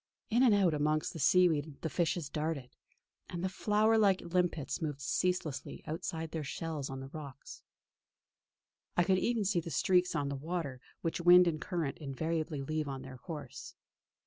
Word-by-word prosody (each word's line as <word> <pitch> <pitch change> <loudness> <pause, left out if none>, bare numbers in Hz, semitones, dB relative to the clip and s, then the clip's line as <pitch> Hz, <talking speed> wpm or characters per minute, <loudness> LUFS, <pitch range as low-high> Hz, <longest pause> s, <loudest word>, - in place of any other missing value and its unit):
In 235 +3 +4
and 240 -5 +6
out 190 -5 +3
amongst 150 +1 0
the 165 - -7
seaweed 155 -1 +3
the - - -1
fishes 170 -1 0
darted, 150 -3 -3 0.6
and 175 0 -4
the 190 - +1
flower 215 +3 +3
like 195 -3 +4
limpets 175 -2 -1
moved 150 -3 -3
ceaselessly 175 -1 -1
outside 160 0 -4
their 160 -2 -3
shells 150 -1 -4
on 135 0 -5
the 135 - -8
rocks. 140 -2 -9 1.4
I 175 - +5
could 185 +1 +3
even 230 -2 0
see 190 -2 +2
the 165 - -6
streaks 180 +1 +2
on 145 -2 0
the 140 - -2
water 145 -3 -4 0.2
which 165 0 -2
wind 175 +1 +8
and 155 -2 -1
current 165 -6 -2
invariably 155 +1 -2
leave 155 +1 -2
on 135 -1 -5
their 130 -1 -10
course. 150 -5 -8
160 Hz, 170 wpm, -33 LUFS, 145-180 Hz, 1.4 s, wind